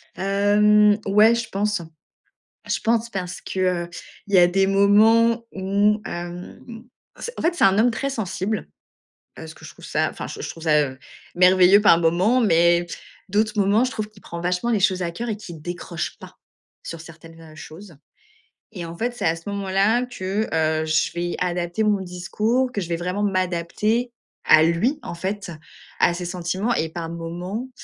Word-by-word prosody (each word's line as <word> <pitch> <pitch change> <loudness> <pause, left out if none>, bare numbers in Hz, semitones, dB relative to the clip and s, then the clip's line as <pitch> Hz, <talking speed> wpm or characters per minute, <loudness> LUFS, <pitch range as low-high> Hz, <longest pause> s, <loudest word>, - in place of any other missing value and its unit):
Hem, 205 +1 +3
ouais, 210 +4 +5
je 235 0 -4
pense. 205 -1 -1 0.9
Je - - -1
pense, 230 0 0
parce 180 -3 -5
que, 185 -2 -1
heu, - - -18 0.4
il 200 - -5
y - - +7
a 175 - +7
des 195 +2 +2
moments 220 +4 +4
où, 200 +2 +1
hem, 180 +7 -8 0.3
c 475 - -6
en - - -4
fait, 335 +2 +1
c'est - - +2
un 195 +1 +4
homme 235 +3 +4
très 275 +5 -3
sensible. 205 -2 -3 0.7
Heu, - - -8
ce - - -11
que - - -16
je - - -9
trouve - - -16
ça - - 0
enfin - - -7
j - - -8
je - - -4
trouve 165 - -11
ça, 150 -2 +4
heu, 130 -2 -5 0.4
merveilleux 185 +2 +6
par 205 -5 +5
moments 180 +9 +2
mais 170 -4 +3 0.4
d'autres 215 +2 0
moments, 205 +3 +3
je 255 - -2
trouve 215 -4 -4
qu'il 215 -2 -20
prend 170 - -7
vachement 180 +6 -1
les 225 - +2
choses 185 -1 +1
à 170 - -2
cœur 235 +8 -6
et 215 - -2
qu'il 175 -7 -10
décroche 175 0 -5
pas - - -14 0.5
sur 165 - -7
certaines, 165 0 -14
heu, 160 -1 -14
choses 165 +2 -12 0.8
et 180 -5 -7
en 165 0 -8
fait, 240 +4 -2
c'est - - -4
à 160 - +2
ce 165 +3 -13
moment 200 -1 -4
là 210 +6 +2
que, 205 -2 -3
heu, 160 0 +1
je 155 0 +1
vais 175 0 -3
adapter 175 +2 -1
mon 210 -2 +1
discours, 210 +8 -1
que 205 -5 -3
je 170 - -6
vais 170 - 0
vraiment 180 +4 -3
m'adapter 195 +5 -1 0.3
à 155 0 +6
lui 170 - +1
en - - -6
fait, 195 +2 -4 0.5
à 175 - +4
ses 180 +1 -5
sentiments 185 +5 -2
et 160 - -1
par 165 0 -6
moments, 175 +8 -6
190 Hz, 190 wpm, -22 LUFS, 175-215 Hz, 0.9 s, y